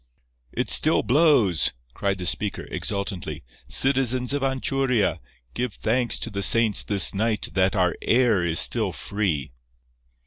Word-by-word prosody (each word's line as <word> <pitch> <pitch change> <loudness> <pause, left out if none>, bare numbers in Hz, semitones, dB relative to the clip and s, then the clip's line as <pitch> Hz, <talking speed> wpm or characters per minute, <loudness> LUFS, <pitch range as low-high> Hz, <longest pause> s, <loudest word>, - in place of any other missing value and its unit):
"It - - -3
still - - +5
blows," 125 - +2 0.2
cried 100 -1 -3
the 90 - -7
speaker, 105 +3 -2
exultantly. 100 -3 -5 0.2
"Citizens 130 -1 +1
of 145 - -2
Anchuria, 135 -4 -1 0.3
give 125 - -4
thanks 120 +2 -1
to - - -2
the 100 0 -5
saints 110 0 +3
this 100 -4 +4
night 110 +2 -2
that 95 0 +1
our 90 -2 0
air 115 -6 +1
is 80 -2 +1
still - - +3
free." 90 -11 -4
110 Hz, 135 wpm, -23 LUFS, 95-125 Hz, 0.3 s, still